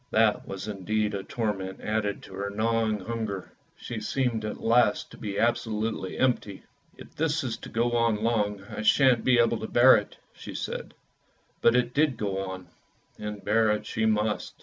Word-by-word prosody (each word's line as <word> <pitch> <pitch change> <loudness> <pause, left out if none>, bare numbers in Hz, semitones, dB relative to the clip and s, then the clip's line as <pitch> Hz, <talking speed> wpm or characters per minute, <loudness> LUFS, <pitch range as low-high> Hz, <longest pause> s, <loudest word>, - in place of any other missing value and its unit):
That 110 -1 +2
was 95 +2 -6
indeed 105 +1 -1
a 100 - -2
torment 95 -3 -3
added 105 -1 -2
to - - -12
her 100 +1 -3
gnawing 110 0 0
hunger; 110 -3 -4 0.3
she 120 - -6
seemed 115 0 -1
at 105 - -4
last 120 +1 +2
to - - -12
be 100 -2 -4
absolutely 110 -4 -1
empty. 120 -6 0 0.2
" - - -34
If - - -13
this 155 0 0
is 120 -3 -2
to - - -10
go 120 +2 0
on 115 -2 +1
long 105 -3 0
I 105 - -7
shan't 125 +1 +4
be 125 -1 +4
able 115 -1 +3
to 110 - -4
bear 125 +2 +7
it," 105 - -6 0.2
said - - -8
she; - - -5 0.7
but 115 - +5
it 125 0 +1
did 150 -1 +2
go 100 -2 -2
on, 95 -2 -7 0.5
and 105 -1 -6
bear 110 +1 +3
it 105 0 0
she 110 -1 0
must. 105 0 0
110 Hz, 185 wpm, -27 LUFS, 105-115 Hz, 0.7 s, bear